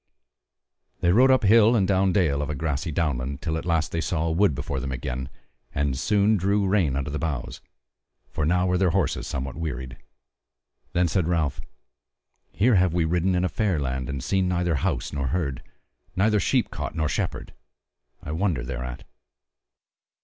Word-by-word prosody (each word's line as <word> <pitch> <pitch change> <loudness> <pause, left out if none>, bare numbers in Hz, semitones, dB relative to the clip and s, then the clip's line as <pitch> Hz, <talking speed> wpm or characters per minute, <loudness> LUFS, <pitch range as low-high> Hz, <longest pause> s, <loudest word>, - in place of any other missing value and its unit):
They 85 - +3
rode 125 +7 +5
up 130 -2 +4
hill 110 +3 +6
and 100 -5 +2
down 95 -1 +2
dale 80 -8 +2
of 75 - -3
a 75 - -2
grassy 80 +2 -2
downland, 70 -4 -1
till 80 -1 -1
at 80 +1 -4
last 80 -3 +1
they 85 - -1
saw 80 -1 -1
a 80 - 0
wood 85 -2 +3
before 70 0 -3
them 65 0 -4
again, 65 0 -4 0.5
and 70 -2 0
soon 105 +8 +2
drew 100 +2 +1
rein 95 -8 +2
under 70 +1 -2
the 75 - -3
boughs; 75 -7 -4 0.7
for 80 - -2
now 90 +4 +2
were 90 -1 +1
their 95 -2 +3
horses 90 -3 0
somewhat 65 -1 -4
wearied. 65 -6 -5 1.0
Then 90 0 +2
said 85 +1 0
Ralph: 80 -5 0 0.9
"Here 115 +6 +3
have 90 -2 +2
we 85 -2 +2
ridden 90 +3 +1
a - - +2
fair 100 -4 0
land, 65 -2 -3
and 70 -2 -4
seen 95 +5 +1
neither 90 -1 0
house - - -2
nor 70 -2 -1
herd, 70 -3 -2 0.5
neither 105 +2 +3
sheep 125 +3 +1
cote - - -5
nor 80 -1 0
shepherd. - - -3 0.7
I 75 - -5
wonder 80 -5 0
thereat." 65 0 -5
80 Hz, 175 wpm, -25 LUFS, 70-95 Hz, 1.0 s, hill